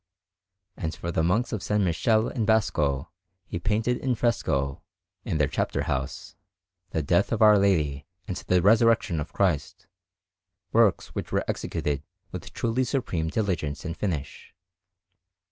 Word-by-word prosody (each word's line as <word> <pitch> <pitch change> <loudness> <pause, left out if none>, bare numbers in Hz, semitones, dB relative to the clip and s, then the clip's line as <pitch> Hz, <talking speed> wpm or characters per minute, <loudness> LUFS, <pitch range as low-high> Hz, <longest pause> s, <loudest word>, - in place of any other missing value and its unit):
And 80 -2 -4
for 85 - -4
the 80 - +1
Monks 100 +10 +1
of 110 - -1
S. - - -7
Michele 110 +5 +2
in 120 - -2
Bosco 75 -11 +1 0.3
he - - -5
painted 110 +6 0
in 130 -2 0
fresco, 70 - 0 0.4
in - - -2
their 75 -2 +3
chapter - - -1
house, 65 0 -4 0.5
the 80 - -1
Death - - +2
of - - +2
Our 105 -1 +7
Lady 75 -8 +1 0.2
and 95 - -3
the 90 -1 +1
Resurrection 110 -4 +4
of 75 - -5
Christ, 90 -8 -1 0.9
works 115 -4 +3
which - - -5
were - - 0
executed 70 -2 -2 0.3
with - - -7
truly 120 +3 0
supreme 115 - -1
diligence 85 -6 -2
and 85 -1 -3
finish. 75 -10 -4
90 Hz, 145 wpm, -26 LUFS, 75-110 Hz, 0.9 s, Our